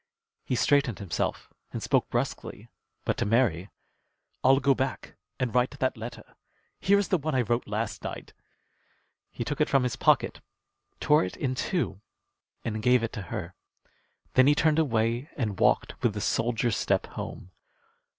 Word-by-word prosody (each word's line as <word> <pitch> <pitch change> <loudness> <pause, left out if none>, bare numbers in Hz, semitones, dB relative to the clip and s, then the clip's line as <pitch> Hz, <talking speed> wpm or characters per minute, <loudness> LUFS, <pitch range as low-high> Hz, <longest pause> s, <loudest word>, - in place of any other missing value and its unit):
He 125 - -1
straightened 140 - +2
himself 95 -5 -3 0.2
and - - -5
spoke - - +2
brusquely, - - -3 0.4
but - - 0
to - - 0
Mary: 105 -6 +2 0.7
"I'll 135 +1 +6
go 140 0 +4
back 130 0 -3 0.2
and 125 -3 -1
write 125 +3 +1
that 130 0 0
letter. 115 +1 -7 0.6
Here 200 +1 +4
is 200 - 0
the 185 - +2
one 155 0 -2
I 125 - +3
wrote 120 +2 -1
last 105 +1 -3
night." - - -6 1.0
He - - -5
took 145 0 -2
it 150 - +3
from 135 -2 +3
his 125 -3 -1
pocket, - - +2 0.6
tore 150 +1 +4
it 90 - -5
in 130 -2 -1
two, 145 - -2 0.6
and 110 -2 -2
gave 125 +1 +4
it 115 - -3
to 105 - -4
her. - - -5 0.8
Then 130 +1 +6
he 145 - +5
turned 155 +1 +3
away 120 -1 +1
and 105 -8 -2
walked - - +2
with 110 -3 +1
the 105 - -3
soldier's 115 +1 +1
step - - +1
home. 95 - -7
125 Hz, 165 wpm, -28 LUFS, 110-140 Hz, 1.0 s, I'll